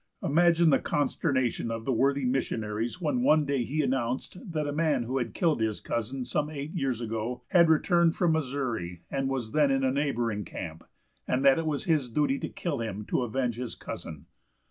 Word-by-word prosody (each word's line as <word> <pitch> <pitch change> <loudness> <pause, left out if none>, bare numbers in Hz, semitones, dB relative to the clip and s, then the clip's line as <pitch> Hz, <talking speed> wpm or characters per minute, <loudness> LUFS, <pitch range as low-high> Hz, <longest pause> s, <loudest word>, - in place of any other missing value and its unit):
Imagine 170 +1 +4
the - - +4
consternation 130 -5 0
of 115 0 -4
the 135 - +1
worthy 135 +3 +2
missionaries 115 0 -1
when 185 +9 0
one 155 - +4
day 140 -3 0
he 150 +6 -1
announced 130 +1 -1 0.2
that 155 -2 -1
a 145 - -2
man 150 -5 +1
who 130 +3 -1
had 120 - -4
killed 165 - +1
his 110 -2 0
cousin 125 +3 -3
some 150 +4 -1
eight 145 0 -5
years 135 - -1
ago 115 +2 -3
had 170 -4 +5
returned 170 +1 +3
from 175 -3 +2
the 160 - +3
Missouri, 120 - -4
and 135 -1 -1
was 125 -5 -3
then 150 -2 +3
in 135 0 +1
a 130 - +3
neighboring 120 -7 -1
camp, 80 -2 -7 0.4
and 130 +2 +1
that 135 +2 +6
it 165 - -2
was 145 -2 -1
his 155 -7 +1
duty 140 +2 +1
to - - -4
kill 160 -7 -3
him 105 -2 -4
to - - 0
avenge 125 -1 -1
his 125 -1 -4
cousin. 80 -4 -7
135 Hz, 200 wpm, -28 LUFS, 115-150 Hz, 0.4 s, that